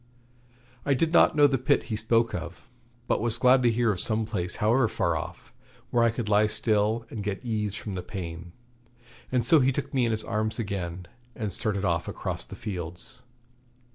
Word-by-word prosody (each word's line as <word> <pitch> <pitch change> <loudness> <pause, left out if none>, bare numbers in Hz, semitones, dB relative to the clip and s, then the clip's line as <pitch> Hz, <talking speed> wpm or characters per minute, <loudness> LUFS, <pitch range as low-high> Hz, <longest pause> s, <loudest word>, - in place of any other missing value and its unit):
I 140 +1 +2
did 165 +5 0
not 170 - +6
know 145 -1 +6
the 135 -2 +3
pit 130 - +2
he - - +1
spoke 115 +1 +2
of, 85 +1 -6 0.4
but - - +1
was 115 0 -1
glad 130 +1 +5
to 120 - +4
hear 115 0 +2
of 95 - -3
some 110 +2 0
place, 95 -5 -2
however 115 +4 +3
far 85 -6 0
off, 80 - -7 0.4
where 120 - +3
I 115 - +5
could 115 -1 -4
lie 105 +1 +4
still 110 +1 +1
and 110 - -5
get 105 +4 -4
ease 105 -3 -1
from 105 -1 -5
the 90 - -3
pain. 85 -2 -7 0.8
And 125 -2 +1
so 160 +5 +6
he 135 0 +3
took 140 +2 -4
me 130 -3 +2
in - - 0
his 110 -1 -2
arms 110 0 -1
again 95 -5 -4 0.3
and 105 -4 -3
started 100 -2 -1
off 85 -1 0
across - - -3
the - - -10
fields. 90 +1 -6
110 Hz, 200 wpm, -27 LUFS, 95-120 Hz, 0.8 s, not